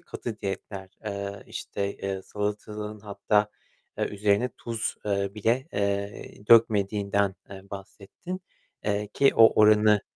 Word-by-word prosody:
katı 110 -3 -6
diyetler. 95 0 -5 0.2
Eee, 100 -1 -4
işte, 100 0 -4
eee, 95 -1 -4
salatalığın 105 +1 -4
hatta, 105 0 +1 0.5
eee, - - +2
üzerine, 105 +2 +1
eee, 125 - -2
tuz, 115 -1 -3
eee, 100 -1 0
bile, 115 +6 +1
eee, 100 0 -3
dökmediğinden, 100 -3 +4 0.2
eee, 95 -1 -9
bahsettin, 100 - -8 0.4
eee, 105 0 -1
ki 140 - +5
o 115 -1 +7
oranı, 105 0 +6
105 Hz, 125 wpm, -27 LUFS, 100-105 Hz, 0.5 s, o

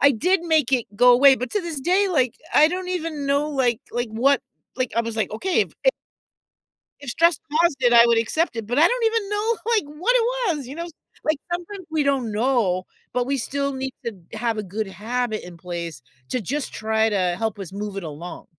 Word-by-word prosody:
I 280 - +7
did 355 - +1
make 315 -6 +2
it 245 -3 +2
go 245 +1 +7
away, 270 +2 +7
but 250 - -4
to 415 - +1
this 330 -5 -5
day, 375 +6 +2
like, 260 -9 +1 0.2
I 305 +1 +7
don't 365 +1 -4
even 325 -5 -3
know, 285 +2 +1
like 250 -5 +1
like 240 0 -1
what 255 +5 +2 0.4
like 255 -2 -1
I - - +4
was 230 -1 -5
like, 215 -4 0
"Okay, 360 - +1
if" - - -9 1.3
"if 270 - -5
stress 335 +1 +3 0.2
caused 340 -4 +3
it, 245 -1 +4
I 235 0 +9
would 235 -1 +4
accept 240 +4 0
it," 225 -2 -4
but 245 +5 -1
I 330 - +7
don't - - 0
even 445 -3 0
know, 430 +2 0 0.2
like, 420 - +2
what 485 +8 +2
it 475 - +3 0.3
was, 275 -4 -7
you 270 - -8
know? 340 +1 -4 0.4
Like, 310 -2 +1
sometimes 355 +1 -5
we 315 -2 +1
don't 270 -5 0
know, 210 -5 +1 0.3
but 250 0 0
we 275 0 0
still 280 +3 -2
need 265 0 -4
to 230 - -1 0.2
have 230 -1 -1
a 215 - -1
good 210 +2 -4
habit 220 +4 -3
in 175 -1 -11
place 170 -6 -6 0.3
to 255 - 0
just 275 +8 -3
try 220 0 +1
to 180 -4 +1
help 220 -2 -2
us 190 -3 -7
move 205 0 -5
it 195 - -4
along. 160 +3 -8
255 Hz, 220 wpm, -23 LUFS, 220-320 Hz, 1.3 s, I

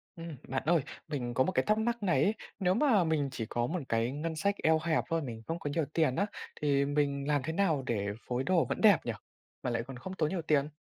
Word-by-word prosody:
Ừm, 165 -3 -7
bạn 135 +1 -2
ơi, 165 0 +4 0.3
mình 130 -6 -3
có 130 - +3
một 185 - 0
cái - - +1
thắc 215 0 +3
mắc 235 0 -1
này 170 -8 +3
ấy, 205 - +3 0.3
nếu 185 -1 +3
mà 225 -4 +4
mình 155 -4 +1
chỉ 115 -3 -4
có 120 +2 -1
một 175 +2 -2
cái 115 +2 +1
ngân 160 +4 -3
sách 200 +5 +1
eo 160 0 +4
hẹp 160 -1 +2
thôi, 165 0 +1
mình 115 -6 -6
không 165 +1 -2
có 145 - -3
nhiều 155 +1 0
tiền 155 -6 +2
á, 200 - +2 0.4
thì 140 -2 +3
mình 140 -1 0
làm 145 -2 +2
thế 160 - -3
nào 165 -7 +1
để 105 -5 -1 0.2
phối 125 +1 -1
đồ 180 +2 +3
vẫn - - -3
đẹp 210 -4 +7
nhỉ? 120 - 0 0.5
Mà - - 0
lại 115 -1 -1
còn 130 +1 -9
không 185 +9 -7
tốn 155 -5 0
nhiều 185 -2 -2
tiền? 150 -2 +2
155 Hz, 260 wpm, -31 LUFS, 135-170 Hz, 0.5 s, đẹp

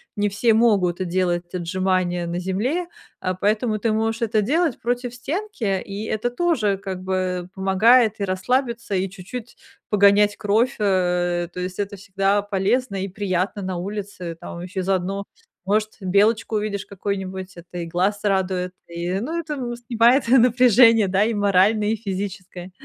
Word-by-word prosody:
не 205 0 +1
все 220 +3 +2
могут, 195 -6 +2
э, - - 0
делать 175 -1 -1
отжимания 180 0 0
на 170 +1 -3
земле, 225 - -1 0.3
а, 185 0 -1
поэтому 215 +3 0
ты 225 +1 0
можешь 225 +1 -1
это 220 -1 +1
делать 315 - +1
против 245 +1 -2
стенки, 270 - -2
и 200 +2 -6
это 220 +3 -1
тоже, 245 - +1
как 190 -2 -6
бы, 185 -1 -2
помогает 215 +4 +4
и 200 - 0
расслабиться, 230 +4 -1
и 190 0 0
чуть-чуть 215 +6 -9 0.3
погонять 205 0 +4
кровь, 220 +6 +1
э, 175 -3 +1
то 180 - -6
есть 180 0 -4
это 200 0 -2
всегда 195 +1 0
полезно 205 +3 0
и 195 - -2
приятно 195 +1 -2
на 185 -1 -3
улице, 190 -3 -5
там 170 - -8
еще 185 +2 -5
и - - -1
заодно, 195 +1 -1 0.4
может, 215 +2 0
белочку 210 +4 +2
увидишь 210 -1 -2
какую-нибудь, 190 -1 -5
это 175 +1 -9
и 170 - -3
глаз 185 +5 0
радует. 185 -2 0 0.2
И, 170 +1 -4
ну, 315 +10 -3
это, 315 -3 -3
м, 245 -3 -4
снимает 240 +2 +3
напряжение, 240 -3 +6
да, 195 +2 +3
и 230 - 0
моральное, 205 +1 +3
и 225 - +1
физическое. 190 -3 -6
200 Hz, 160 wpm, -22 LUFS, 185-225 Hz, 0.4 s, напряжение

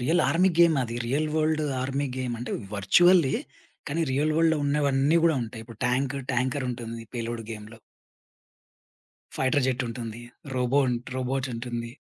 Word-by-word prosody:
Real 160 +8 +2
army 185 +3 +3
game 170 -2 +6
అది. 115 0 -4
Real 145 +6 0
world 155 0 +1 0.2
army 135 +2 -1
game. 125 -2 -2
అంటే 120 - -5 0.2
వర్చువల్లె 165 - +5 0.5
కానీ 165 +4 0
రియల్ 150 +3 +1
వర్‌ల్డ్‌లో 160 -1 +3
ఉన్నవన్నీ 140 +1 +2
గూడా 160 -4 +4
ఉంటాయి. 115 0 -7
ఇప్పుడు 115 -2 -13
ట్యాంకు 135 +2 0
ట్యాంక‌రుంటుంది 125 -2 -2
పేలుడు 115 -1 -4
గేమ్‌లో. 110 +1 -8 1.6
ఫైటర్ 130 +1 +2
జెట్టుంటుంది. 120 -2 -3 0.3
రోబో 125 +3 +2 0.3
రోబోటుంటుంది. 125 -2 -3
130 Hz, 125 wpm, -26 LUFS, 120-150 Hz, 1.6 s, game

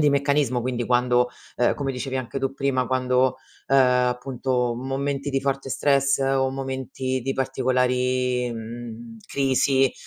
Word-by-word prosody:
di 150 - +5
meccanismo, 140 -3 +1
quindi 120 -2 -2
quando 125 0 +3 0.3
ehm, 120 - +2
come 135 -2 -2
dicevi 130 +1 -4
anche 130 +1 -3
tu 135 0 -2
prima, 130 -3 0
quando, 130 0 +2 0.3
uhm, 135 - +4
appunto, 125 -1 +1
momenti 135 +2 -3
di 135 - +1
forte 135 0 -2
stress 140 0 +2
o 135 0 +2
momenti 130 -1 -3
di 135 +1 -1
particolari, 125 -1 +1
mhmm, 115 0 -8
crisi, 135 -1 +2
130 Hz, 135 wpm, -24 LUFS, 125-135 Hz, 0.3 s, di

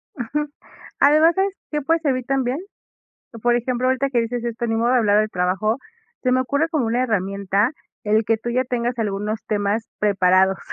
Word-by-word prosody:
Ujú. 295 +4 -3 0.5
Además, 310 +4 +5
¿sabes 385 0 +1 0.2
que 300 0 -1
puedes 325 +3 +1
servir 255 -5 0
también? 265 0 0 0.9
Por 240 0 +3
ejemplo, 250 +1 -1
ahorita 260 +1 +1
que 240 -3 +2
dices 235 +1 -3
esto, 235 0 -3
ni 225 0 0
modo 235 +2 +2
de 255 - +4
hablar 210 -2 +3
al 215 0 +1
trabajo, 190 +5 0 0.5
se 255 -1 +2
me 255 - +3
ocurre 285 +5 0
como 305 -8 0
una 240 +3 +1
herramienta 200 0 0 0.3
el 215 +1 +2
que 225 0 +1
tú 240 - -6
ya 255 +2 +1
tengas 245 -1 -2
algunos 210 +1 -2
temas 210 +2 -1
preparados. 190 -2 +3
235 Hz, 185 wpm, -21 LUFS, 210-260 Hz, 0.9 s, Además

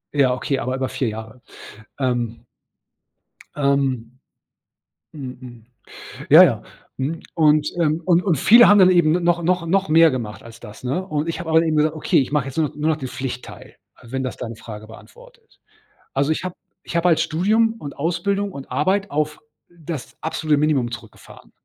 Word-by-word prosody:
Ja, 135 -3 +4
okay, 135 +1 -2
aber 130 +2 -2
über 130 0 -2
4 125 -4 -2
Jahre. 110 +2 -9 0.6
Ähm. 120 -3 -2 1.1
Ähm. 135 -4 -1 0.9
Mhm, 130 -4 -8
mhm. 120 -3 -12 0.7
Ja, - - +10
ja. - - 0 0.3
Mhm. 150 +5 -3
Und, 150 -2 +3
ähm, 160 0 +1
und 175 0 +3
und 175 -8 +1
viele 235 - +7
haben 205 - +6
dann 185 -1 +7
eben 170 -3 +4
n 180 - -3
noch 175 0 +2
noch 175 0 0
noch 195 +3 +1
mehr 165 0 +6
gemacht 110 -5 -5
als 115 -1 -13
das, 110 +2 -12
ne? 145 +9 -2
Und 155 -2 -2
ich 165 - -3
habe 165 -2 -5
aber 160 +1 +5
eben 160 -2 0
gesagt: 155 +1 +2
„Okay, - - +1
ich 135 - -3
mache 150 -3 +1
jetzt 135 - -8
nur 155 -2 +2
noch - - -16
nur 150 +2 0
noch 155 - +1
den 130 -4 -6
Pflichtteil“, 125 -1 -7 0.3
wenn 130 +3 -4
das 130 - -4
deine 115 -2 -7
Frage 110 -1 -10
beantwortet. 475 - -17 0.5
Also 140 +3 +1
ich 160 - -4
habe 185 -1 -4 0.3
ich - - -6
habe 170 +1 +2
als 165 - +3
Studium 220 +7 +1
und 145 -6 -8
Ausbildung 195 +6 -1
und 140 -4 -10
Arbeit 195 +6 0
auf 150 +1 -2 0.3
das 165 -4 -8
absolute 155 -1 0
Minimum 145 -5 +1
zurückgefahren. 115 -2 -12
150 Hz, 185 wpm, -21 LUFS, 130-170 Hz, 1.1 s, Ja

